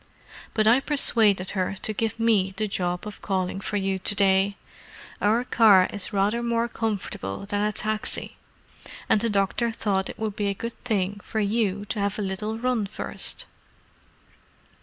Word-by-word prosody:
"But 215 Hz, -, +3 dB
I 230 Hz, +4 st, +6 dB
persuaded 220 Hz, -9 st, +2 dB
her 190 Hz, 0 st, -1 dB
to 215 Hz, -, 0 dB
give 225 Hz, +2 st, -2 dB
me 205 Hz, -4 st, +2 dB
the 215 Hz, 0 st, 0 dB
job 180 Hz, -2 st, -2 dB
of 210 Hz, -, -8 dB
calling 190 Hz, -1 st, -2 dB
for 205 Hz, -, -2 dB
you 195 Hz, -1 st, -1 dB
to 205 Hz, -, +1 dB
day: 195 Hz, 0 st, +3 dB, 0.6 s
our 220 Hz, +4 st, +3 dB
car 210 Hz, -7 st, +6 dB
is 205 Hz, -3 st, -1 dB
rather 205 Hz, +4 st, +1 dB
more 235 Hz, 0 st, 0 dB
comfortable 200 Hz, -, -3 dB
than 205 Hz, 0 st, -1 dB
a 210 Hz, 0 st, +1 dB
taxi, 215 Hz, +1 st, -2 dB, 0.7 s
and 210 Hz, -, +3 dB
the 230 Hz, -, +1 dB
doctor 205 Hz, +3 st, +1 dB
thought 200 Hz, -4 st, -1 dB
it -, -, -8 dB
would 215 Hz, -2 st, -3 dB
be 205 Hz, -1 st, -1 dB
a 200 Hz, -, -1 dB
good 230 Hz, +4 st, -5 dB
thing 205 Hz, -4 st, -1 dB
for 220 Hz, -, -3 dB
you 205 Hz, -1 st, 0 dB
to 210 Hz, +1 st, -3 dB
have 200 Hz, 0 st, -1 dB
a 210 Hz, -, -2 dB
little 210 Hz, +3 st, -3 dB
run 240 Hz, -3 st, 0 dB
first." 195 Hz, -, -4 dB
205 Hz, 170 wpm, -25 LUFS, 195-225 Hz, 0.7 s, I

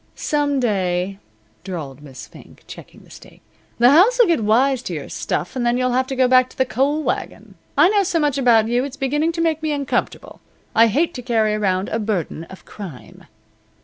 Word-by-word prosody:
"Some 290 Hz, -2 st, -1 dB
day," 195 Hz, -4 st, -1 dB, 0.4 s
drawled 155 Hz, -8 st, -7 dB
Miss 135 Hz, -3 st, -11 dB
Fink, -, -, -17 dB
checking -, -, -13 dB
the -, -, -20 dB
steak, -, -, -15 dB, 0.4 s
"the 240 Hz, +2 st, +5 dB
house'll 460 Hz, -, +5 dB
get 340 Hz, -, +1 dB
wise 250 Hz, +5 st, +2 dB
to 180 Hz, -9 st, -5 dB
your 145 Hz, -, -7 dB
stuff 220 Hz, -, -4 dB
and 255 Hz, -, -2 dB
then 240 Hz, 0 st, +1 dB
you'll 255 Hz, 0 st, 0 dB
have 260 Hz, +1 st, +1 dB
to 265 Hz, -, -4 dB
go 255 Hz, -1 st, +3 dB
back 255 Hz, 0 st, +4 dB
to -, -, -19 dB
the 260 Hz, -, +2 dB
coal 280 Hz, +5 st, 0 dB
wagon. -, -, -4 dB, 0.2 s
I -, -, +6 dB
know 410 Hz, 0 st, +3 dB
so 370 Hz, -3 st, -1 dB
much 295 Hz, -3 st, 0 dB
about 230 Hz, -4 st, +4 dB
you 240 Hz, +2 st, 0 dB
it's 275 Hz, 0 st, -7 dB
beginning 295 Hz, +4 st, 0 dB
to 335 Hz, -, -3 dB
make 320 Hz, -2 st, 0 dB
me 310 Hz, -1 st, -2 dB
uncomfortable. 280 Hz, -2 st, -3 dB, 0.3 s
I 230 Hz, +1 st, +5 dB
hate 315 Hz, +10 st, 0 dB
to 250 Hz, -, -7 dB
carry 225 Hz, -3 st, +1 dB
around 195 Hz, -2 st, 0 dB
a 225 Hz, -, -2 dB
burden 195 Hz, -6 st, -3 dB
of 190 Hz, -, -14 dB
crime." 180 Hz, -11 st, -11 dB
250 Hz, 205 wpm, -20 LUFS, 205-285 Hz, 0.4 s, I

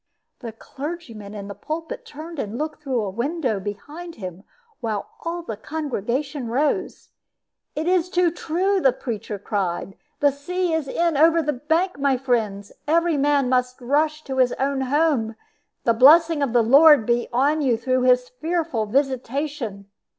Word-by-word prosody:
The 235 Hz, -3 st, -6 dB
clergyman 230 Hz, -5 st, -8 dB
in 200 Hz, -1 st, -6 dB
the 200 Hz, -, -6 dB
pulpit 320 Hz, -, -6 dB
turned 315 Hz, 0 st, -8 dB
and 215 Hz, -1 st, -4 dB
looked 305 Hz, +2 st, -4 dB
through 260 Hz, -6 st, -1 dB
a 195 Hz, -, -3 dB
window 245 Hz, -, -1 dB
behind 295 Hz, -, -7 dB
him, 185 Hz, -2 st, -8 dB, 0.4 s
while 220 Hz, -5 st, -3 dB
all 340 Hz, +1 st, -3 dB
the 225 Hz, -, -5 dB
congregation 275 Hz, 0 st, -3 dB
rose. 280 Hz, +6 st, -1 dB, 0.7 s
"It 315 Hz, +2 st, -2 dB
is 360 Hz, -1 st, +2 dB
too 355 Hz, -1 st, +2 dB
true," 370 Hz, +4 st, 0 dB
the 265 Hz, -5 st, +4 dB
preacher 215 Hz, -4 st, -5 dB
cried; 195 Hz, -2 st, -3 dB, 0.2 s
"the 285 Hz, -1 st, +4 dB
sea 350 Hz, +5 st, -2 dB
is 320 Hz, -3 st, -1 dB
in 335 Hz, +3 st, 0 dB
over 330 Hz, +2 st, +5 dB
the 300 Hz, 0 st, 0 dB
bank, 320 Hz, +5 st, 0 dB
my 275 Hz, -2 st, +2 dB
friends. 220 Hz, -6 st, -1 dB, 0.2 s
Every 335 Hz, +1 st, +3 dB
man 285 Hz, -1 st, +2 dB
must 250 Hz, 0 st, 0 dB
rush 300 Hz, +4 st, 0 dB
to 265 Hz, -1 st, -5 dB
his 255 Hz, -1 st, +3 dB
own 270 Hz, 0 st, -1 dB
home. 265 Hz, -5 st, +1 dB, 0.5 s
The 230 Hz, -, +3 dB
blessing 310 Hz, +6 st, +6 dB
of 275 Hz, -4 st, +1 dB
the 240 Hz, -1 st, +4 dB
Lord 280 Hz, +1 st, +7 dB
be 240 Hz, +1 st, +1 dB
on 285 Hz, +6 st, +2 dB
you 250 Hz, -5 st, +2 dB
through 255 Hz, +2 st, 0 dB
His 250 Hz, 0 st, +3 dB
fearful 315 Hz, -5 st, -2 dB
visitation!" 260 Hz, -4 st, -2 dB
275 Hz, 160 wpm, -23 LUFS, 235-315 Hz, 0.7 s, Lord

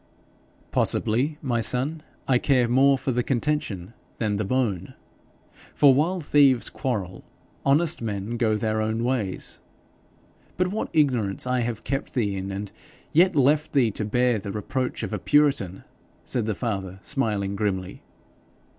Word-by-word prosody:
'Possibly, 130 Hz, +7 st, +1 dB
my 120 Hz, -4 st, 0 dB
son, 135 Hz, +7 st, -1 dB, 0.3 s
I 125 Hz, -2 st, +3 dB
care 125 Hz, -3 st, +2 dB
more 135 Hz, +3 st, +4 dB
for 130 Hz, -, -2 dB
the 125 Hz, 0 st, +1 dB
contention 120 Hz, -7 st, -2 dB, 0.2 s
than 105 Hz, -3 st, -1 dB
the 105 Hz, -, -1 dB
bone, 110 Hz, -5 st, -1 dB, 0.8 s
for 140 Hz, -2 st, +6 dB
while 165 Hz, +7 st, +1 dB
thieves 140 Hz, -5 st, +4 dB
quarrel 100 Hz, -9 st, -3 dB, 0.4 s
honest 150 Hz, +2 st, +2 dB
men 105 Hz, 0 st, -3 dB
go 115 Hz, -2 st, +1 dB
their 110 Hz, 0 st, -1 dB
own 110 Hz, +1 st, -1 dB
ways. 120 Hz, -7 st, -2 dB, 1.0 s
But 180 Hz, 0 st, +1 dB
what 210 Hz, +3 st, -3 dB
ignorance 125 Hz, -11 st, +1 dB
I 125 Hz, 0 st, +1 dB
have 120 Hz, -2 st, -3 dB
kept 135 Hz, +2 st, -3 dB
thee 105 Hz, -6 st, 0 dB
in, 95 Hz, 0 st, -4 dB
and 100 Hz, +1 st, -5 dB, 0.4 s
yet 180 Hz, +3 st, +5 dB
left 145 Hz, +2 st, +3 dB
thee 125 Hz, -6 st, +3 dB
to 105 Hz, -, -4 dB
bear 120 Hz, +2 st, +1 dB
the 100 Hz, 0 st, -6 dB
reproach 125 Hz, +5 st, -3 dB
of -, -, -4 dB
a -, -, -2 dB
puritan!' 140 Hz, -, +2 dB, 0.4 s
said 120 Hz, -4 st, -1 dB
the 110 Hz, -, -1 dB
father, 95 Hz, -5 st, -3 dB
smiling 105 Hz, -6 st, -1 dB
grimly. 95 Hz, -2 st, -2 dB
120 Hz, 145 wpm, -25 LUFS, 105-135 Hz, 1.0 s, for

